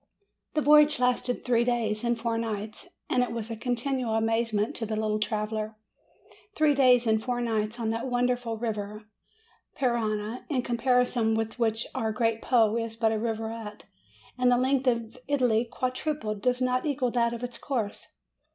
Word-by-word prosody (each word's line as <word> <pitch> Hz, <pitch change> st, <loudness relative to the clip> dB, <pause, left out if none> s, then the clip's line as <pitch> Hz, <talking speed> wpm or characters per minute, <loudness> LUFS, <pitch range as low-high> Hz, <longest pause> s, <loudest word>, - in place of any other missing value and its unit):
The 305 Hz, -, +2 dB
voyage 300 Hz, 0 st, +6 dB
lasted 250 Hz, 0 st, 0 dB
three 240 Hz, -2 st, +3 dB
days 230 Hz, -3 st, 0 dB
and 235 Hz, -1 st, 0 dB
four 230 Hz, 0 st, -1 dB
nights, 220 Hz, -1 st, -4 dB, 0.2 s
and 250 Hz, -, +2 dB
it 250 Hz, -, -1 dB
was 230 Hz, -1 st, -4 dB
a -, -, -3 dB
continual 245 Hz, 0 st, -1 dB
amazement 225 Hz, -1 st, 0 dB
to 225 Hz, -, -2 dB
the 215 Hz, -, -2 dB
little 215 Hz, 0 st, 0 dB
traveller. 215 Hz, 0 st, -2 dB, 0.8 s
Three 305 Hz, -5 st, +4 dB
days 250 Hz, -3 st, +5 dB
and 220 Hz, -1 st, +2 dB
four 245 Hz, +1 st, -2 dB
nights 225 Hz, -1 st, -1 dB
on 225 Hz, -1 st, 0 dB
that 230 Hz, +3 st, -3 dB
wonderful 245 Hz, -2 st, 0 dB
river 215 Hz, -2 st, -4 dB, 0.7 s
Parana, 225 Hz, -2 st, -1 dB
in 260 Hz, -5 st, 0 dB
comparison 240 Hz, -2 st, +2 dB
with 225 Hz, +2 st, -3 dB
which 225 Hz, -1 st, +1 dB
our 220 Hz, -1 st, -1 dB
great 225 Hz, 0 st, 0 dB
Po 225 Hz, -3 st, +3 dB
is 230 Hz, -1 st, -3 dB
but 225 Hz, -1 st, +2 dB
a 220 Hz, -, 0 dB
rivulet; 225 Hz, -1 st, -4 dB, 0.6 s
and 250 Hz, 0 st, +4 dB
the 245 Hz, -, +4 dB
length 260 Hz, +1 st, +1 dB
of 230 Hz, 0 st, 0 dB
Italy 250 Hz, -5 st, +2 dB
quadrupled 250 Hz, -3 st, -3 dB
does 250 Hz, +3 st, +1 dB
not 255 Hz, 0 st, +1 dB
equal 270 Hz, -5 st, 0 dB
that 235 Hz, -1 st, +2 dB
of 235 Hz, -, -8 dB
its 245 Hz, -1 st, -5 dB
course. 230 Hz, -7 st, -3 dB
230 Hz, 170 wpm, -27 LUFS, 220-250 Hz, 0.8 s, voyage